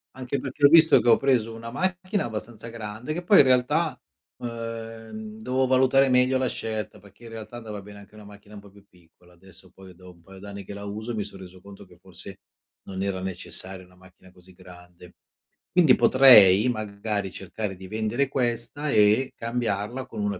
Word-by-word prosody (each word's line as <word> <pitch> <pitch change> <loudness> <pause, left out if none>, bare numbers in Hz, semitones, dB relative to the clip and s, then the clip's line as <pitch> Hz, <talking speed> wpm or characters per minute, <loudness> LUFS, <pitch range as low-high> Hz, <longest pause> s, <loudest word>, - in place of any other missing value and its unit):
Anche 130 +1 -4
perché 135 +2 0
ho - - +8
visto 160 0 +6
che 120 - +1
ho 115 - +6
preso 120 -5 +1
una 115 +1 -8
macchina 185 - -2
abbastanza 110 0 -7
grande 115 +4 -6
che 175 +3 -5
poi 195 +3 +6
in - - +9
realtà, 130 +3 +1 0.4
uhm, 115 - -7
dovevo 130 -8 0
valutare 130 +1 +3
meglio 125 +1 +3
la 130 - 0
scelta, 110 -3 -5
perché 100 +3 -20
in - - -10
realtà 115 +1 -9
andava 105 -3 -8
bene 100 0 -12
anche 100 +1 -17
una 105 - -13
macchina 105 +1 -15
un 100 - -10
po' 100 -1 -17
più 100 0 -20
piccola, 90 0 -25
adesso 95 +1 -19
poi 95 -1 -15
dopo 90 0 -15
un - - -24
paio 95 +1 -14
d'anni 100 0 -9
che 100 - -9
la 100 0 -8
uso 110 +4 -6
mi 105 - -2
son 100 -1 -11
reso 90 0 -13
conto 100 +1 -13
che - - -20
forse - - -12 0.5
non 95 0 -5
era 100 -1 -2
necessaria 95 0 -5
una 90 - -23
macchina 95 0 -20
così 90 0 -20
grande. 90 -1 -16 0.6
Quindi 165 -8 +5
potrei, 115 -5 +7
magari, 105 -3 -4
cercare 95 +1 -6
di 95 0 -11
vendere 110 +6 -1
questa 125 +3 -2
e 105 +5 +3
cambiarla 115 +1 -3
con 125 - -7
una 100 -2 -2
110 Hz, 195 wpm, -25 LUFS, 95-125 Hz, 0.6 s, in